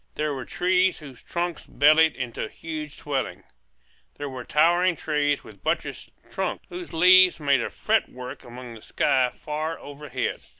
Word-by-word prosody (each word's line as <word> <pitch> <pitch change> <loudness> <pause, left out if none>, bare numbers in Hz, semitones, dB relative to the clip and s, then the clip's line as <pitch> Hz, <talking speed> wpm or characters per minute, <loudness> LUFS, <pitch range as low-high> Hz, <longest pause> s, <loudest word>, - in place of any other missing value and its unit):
There 150 -1 -1
were 130 -2 -5
trees 185 0 +2
whose 140 -5 -12
trunks 175 -1 -3
bellied 155 +2 +5
into 125 -3 -4
huge 155 -2 -7
swellings. 140 -3 -3 0.7
There 145 -1 -5
were 130 -1 -6
towering 175 +6 +3
trees 145 -2 0
with - - -14
buttressed - - -2 0.2
trunks, - - -3
whose 355 0 -7
leaves 185 +1 +6
made 140 -2 +3
a - - -2
fretwork 125 0 -2
against 120 -2 -10
the - - -19
sky 130 -2 +3
far 155 +4 -4
overhead. 140 -3 -4
150 Hz, 145 wpm, -25 LUFS, 130-165 Hz, 0.7 s, leaves